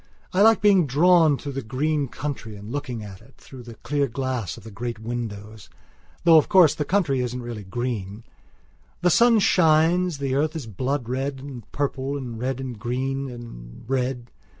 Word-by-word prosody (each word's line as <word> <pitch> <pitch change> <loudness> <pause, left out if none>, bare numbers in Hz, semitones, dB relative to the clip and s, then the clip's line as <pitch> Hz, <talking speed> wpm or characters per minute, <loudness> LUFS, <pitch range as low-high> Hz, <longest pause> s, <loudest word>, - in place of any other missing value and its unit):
I 185 - +2
like 225 +1 +6
being 195 -6 +5
drawn 160 +1 +4
through 145 - -6
the 135 0 -4
green 140 +5 -1
country 130 -5 -6
and 105 +2 -9
looking 125 -6 -4
at 100 -3 -10
it 135 - -20
through 130 -2 -12
the 120 -1 -11
clear 145 +2 -1
glass 125 -7 -3
of - - -13
the 110 - -10
great 115 +2 -5
windows. 110 -2 -6 0.5
Though, 165 -2 +7
of 155 - +3
course, 180 -6 +6
the 150 - -3
country 150 -6 +1
isn't 125 0 -3
really 115 -3 -6
green. 110 -1 -4 0.8
The 180 0 +3
sun 235 +5 +5
shines, 170 -2 +3
the 135 -2 -2
earth 150 +4 0
is 155 -6 -5
blood 125 +4 -3
red 135 +2 -3
and 130 -5 -10
purple 140 0 -2
and 120 -5 -6
red 130 +1 -2
and 125 -4 -6
green 135 +3 -2
and 115 - -10
red. 125 -2 -2
130 Hz, 180 wpm, -24 LUFS, 120-150 Hz, 0.8 s, Though